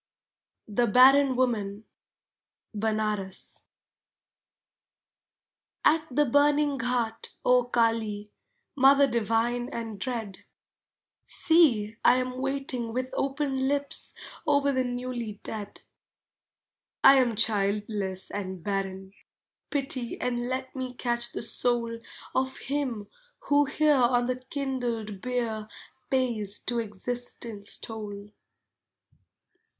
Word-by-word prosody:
THE 235 +3 +1
BARREN 265 +3 +6
WOMAN 220 -5 0 0.9
(Benares) 210 -3 -2 2.2
At 320 +1 +4
the 295 +3 +2
burning 290 +1 +3
ghat, 230 -2 -1 0.2
O 250 -1 +5
Kali, 225 -3 0 0.4
Mother 275 +1 +6
divine 235 0 0
and 225 -3 -6
dread, 220 -3 -4 0.8
See, 240 -11 +3
I 245 - +6
am 255 0 -2
waiting 270 -3 -1
with 255 +1 -2
open 270 -1 -1
lips 280 0 -3 0.3
Over 285 -1 +3
the 260 -1 +1
newly 245 -3 -4
dead. 210 -2 -7 1.2
I 270 0 +9
am 240 -3 +2
childless 200 -2 0
and 190 -3 -5
barren; 195 -1 -3 0.6
pity 270 -4 -2
And 245 0 -2
let 260 +1 -4
me 255 -1 -4
catch 240 -1 -1
the - - -5
soul 235 0 -1 0.3
Of 260 0 0
him 260 -7 -3 0.3
who 290 0 +3
here 300 +2 +3
on 245 -2 +3
the 255 0 -1
kindled 250 -6 -4
bier 235 -4 -2 0.4
Pays 230 -6 +1
to 240 -1 0
Existence 225 -1 -3
toll. 210 -2 -7
240 Hz, 100 wpm, -27 LUFS, 215-265 Hz, 2.2 s, I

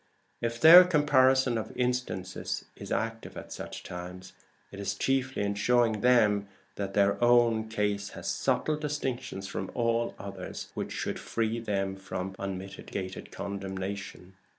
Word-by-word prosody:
If 115 0 -2
their 170 +7 +11
comparison 130 -7 +3
of 110 - -6
instances 125 -7 -2
is - - -9
active 115 0 -3
at - - -8
such - - -7
times, 90 +1 -8 0.4
it 100 - -9
is 100 0 -2
chiefly 130 0 0
in 100 0 0
showing 115 0 +2
them 105 -5 +4 0.3
that 100 -1 -4
their 100 +3 +3
own 120 -2 +4
case 105 -2 -1
has - - -6
subtle 155 -1 0
distinctions 135 -9 -3
from 95 -1 -4
all 115 0 0
other - - -7
cases, - - -8
which - - -4
should - - -3
free 115 0 -1
them 100 -4 -2
from 95 -1 -5
unmitigated 95 0 -6
condemnation. 95 -1 -5
105 Hz, 140 wpm, -29 LUFS, 95-120 Hz, 0.4 s, their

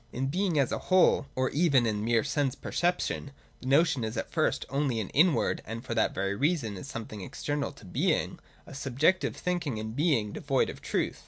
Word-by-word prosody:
In 135 +2 -2
Being 180 +1 0
as 140 -3 +2
a - - -1
whole, 185 -6 +4
or 130 0 0
even 140 -6 +3
in 105 -2 -1
mere 115 0 +2
sense 145 -2 0
perception, 175 -4 -1 0.3
the 130 - -8
notion 140 -2 +3
is 110 +1 -3
at - - -4
first - - 0
only 135 -4 0
an 105 - -3
inward, 155 -4 +3
and 115 +3 -7
for 120 - -3
that 110 -1 +2
very 100 +1 -2
reason 140 - 0
is 95 - -8
something 110 -5 -7
external 140 +6 -3
to 130 - -15
Being, 90 - 0 0.3
a - - -11
subjective 140 +7 +1
thinking 175 -9 -2
and 110 +1 -5
being, 140 -9 +1
devoid 135 -2 0
of - - -13
truth. - - -1
135 Hz, 195 wpm, -29 LUFS, 115-150 Hz, 0.3 s, whole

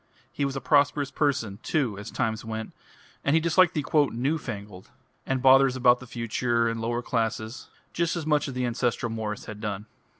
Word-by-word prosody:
He 140 - -1
was 140 0 -3
a 135 - -3
prosperous 145 -1 +2
person, 125 -9 0
too, 130 -9 0
as 105 - -7
times 110 -1 -2
went, 110 -1 -5 0.5
and 140 - +2
he - - +5
disliked 170 +2 +3
the 150 -3 -1 0.3
"new 135 +7 0
fangled," 100 -7 -8 0.4
and 135 -1 -1
bothers 135 0 +6
about 125 -1 +4
the 125 - -11
future 115 0 0
and 115 0 -2
the 115 - -3
lower 120 +1 -1
classes, 115 0 -2 0.2
just 170 0 0
as 170 -3 -3
much 150 -2 +2
as 135 - -6
the 125 0 0
ancestral 120 -1 -1
Morris 110 -2 -4
had 105 -1 -8
done. 105 0 -4
125 Hz, 195 wpm, -26 LUFS, 110-140 Hz, 0.5 s, bothers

